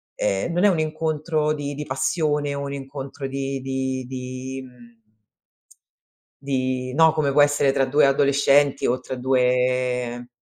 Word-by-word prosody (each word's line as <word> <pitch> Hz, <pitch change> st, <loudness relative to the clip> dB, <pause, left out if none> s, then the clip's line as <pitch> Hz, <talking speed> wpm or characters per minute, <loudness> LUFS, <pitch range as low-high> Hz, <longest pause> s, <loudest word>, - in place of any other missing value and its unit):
ehm, 95 Hz, -, -1 dB
non 175 Hz, +4 st, +2 dB
è -, -, +7 dB
un 175 Hz, -4 st, +1 dB
incontro 155 Hz, 0 st, -1 dB
di 145 Hz, -1 st, -4 dB
di 150 Hz, +1 st, -5 dB
passione 145 Hz, +1 st, 0 dB
o 140 Hz, -, -4 dB
un 140 Hz, 0 st, -5 dB
incontro 135 Hz, 0 st, -6 dB
di 135 Hz, 0 st, -4 dB
di 130 Hz, -1 st, -3 dB
di 130 Hz, +1 st, -6 dB
mhmm 120 Hz, -2 st, -17 dB, 1.4 s
di 130 Hz, -2 st, -2 dB
no, 160 Hz, +3 st, +5 dB
come 145 Hz, -3 st, 0 dB
può 145 Hz, -, +5 dB
essere 145 Hz, -1 st, +3 dB
tra 135 Hz, -, +2 dB
2 145 Hz, +3 st, +3 dB
adolescenti 140 Hz, 0 st, +3 dB
o 125 Hz, +1 st, +1 dB
tra 130 Hz, -, -6 dB
2 125 Hz, -1 st, 0 dB
135 Hz, 150 wpm, -23 LUFS, 130-145 Hz, 1.4 s, è